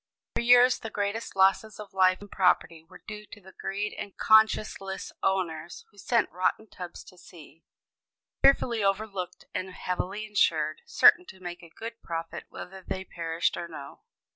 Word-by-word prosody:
For - - +1
years 245 +1 +6
the 225 - -6
greatest 205 +1 -3
losses 195 +3 +3
of 205 -3 -9
life 185 0 +4
and 205 - -12
property 180 -3 +2
were 180 +3 -16
due 210 -1 -8
to - - -12
the 190 -1 -15
greed 205 +3 -4
of 200 - -7
conscienceless 215 -3 +3
owners, 175 -4 -2
who 205 - -19
sent 230 +4 +1
rotten 185 +5 0
tubs 180 -3 -9
to 180 - -16
sea, 165 -2 -15 0.8
fearfully 240 -5 +4
overloaded 195 -2 -2
and 185 +1 -3
heavily 185 +3 -3
insured, 160 -7 +1
certain 360 - +6
to 190 - -12
make 175 -1 -7
a 170 - -13
good 230 +6 -8
profit 165 0 -5
whether 190 +1 -9
they 190 0 -4
perished 165 -1 -1
or 170 - -4
no. 140 -4 -10
190 Hz, 165 wpm, -28 LUFS, 175-210 Hz, 0.8 s, years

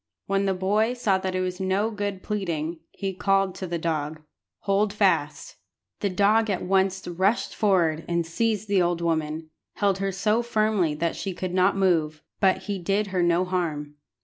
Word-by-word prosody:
When 195 0 0
the 190 - +1
boy 210 +6 +1
saw 205 -6 +1
that 185 0 -3
it 185 - 0
was 180 0 -3
no 195 +4 0
good 205 -3 -4
pleading, 170 -6 -3
he 195 -1 -4
called 195 0 +1
to 190 0 -6
the 170 0 -2
dog 155 -2 -3 0.4
"Hold 200 +1 +1
fast." 205 - 0 0.4
The 200 - 0
dog 210 +4 +3
at 190 -3 -1
once 190 0 +1
rushed 190 +6 0
forward, 170 -6 +2
and, 170 -1 0
seizing 215 +5 -1
the 190 - +5
old 175 -1 +1
woman, 160 -1 -2 0.2
held 200 -2 +1
her 195 0 -1
so 210 +4 +1
firmly 215 -8 +1
that 165 +2 -1
she 195 -3 -4
could 185 0 -4
not 185 +2 +3
move; 160 -5 +1 0.2
but 190 -1 +3
he 200 -2 -3
did 200 +4 0
her 180 - +2
no 175 +1 +3
harm. 160 -5 -2
190 Hz, 180 wpm, -25 LUFS, 170-200 Hz, 0.4 s, the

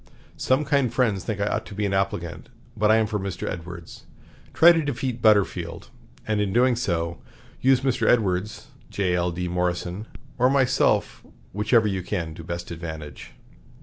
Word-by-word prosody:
Some 130 +4 +1
kind 140 -5 +1
friends 110 -7 +1
think 105 -3 -3
I 100 - +1
ought - - -1
to 100 - -9
be 105 0 -1
an 100 - -1
applicant, 85 -4 -2 0.3
but 105 0 +2
I 110 - +6
am 110 0 +3
for 105 0 -2
Mr. 95 -2 -4
Edwards. 85 -1 -8 0.5
Try 170 +2 +7
to 165 -1 +2
defeat 130 -4 -3
Butterfield, 100 -6 +1 0.4
and, 105 -1 0
in 100 -2 -1
doing 125 +3 +3
so, 85 -7 -2 0.4
use 130 0 +3
Mr. 130 -3 0
Edwards, 100 -3 0 0.2
J.L.D. 90 -2 -1
Morrison, 90 +3 -2 0.3
or 125 +1 +5
myself, 130 -2 +1 0.3
whichever 110 +2 +3
you 95 -2 -1
can 85 -4 -3
to 80 - -10
best 85 +1 -6
advantage." 80 -4 -8
100 Hz, 160 wpm, -24 LUFS, 90-120 Hz, 0.5 s, Try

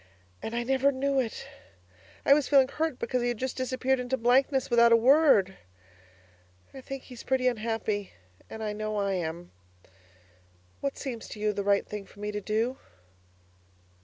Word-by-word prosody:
And 225 - -5
I 240 - -1
never 265 +2 +2
knew 275 0 0
it. 235 -4 -3 0.8
I 275 - +7
was 285 -2 +2
feeling 270 -3 +5
hurt 315 -2 -2
because 250 +1 -1
he 240 - 0
had 240 -1 -1
just 260 +2 -3
disappeared 255 0 0
into 250 +1 -2
blankness 260 +2 +2
without 235 0 +6
a - - +8
word. 235 -6 +4 1.2
I 265 - -9
think 270 0 -7
he's 250 -3 -11
pretty 260 -1 0
unhappy, 220 -4 -2 0.4
and 220 - -7
I 210 -1 -2
know 215 0 -3
I 200 -1 0
am! 175 -1 -4 1.3
What 280 - -3
seems 245 -5 -6
to 215 - -9
you 210 0 0
the 200 - -3
right 200 0 +2
thing 210 -2 -7
for 205 - -18
me 210 0 -3
to 210 0 -4
do? 225 +5 -1
240 Hz, 170 wpm, -28 LUFS, 210-265 Hz, 1.3 s, a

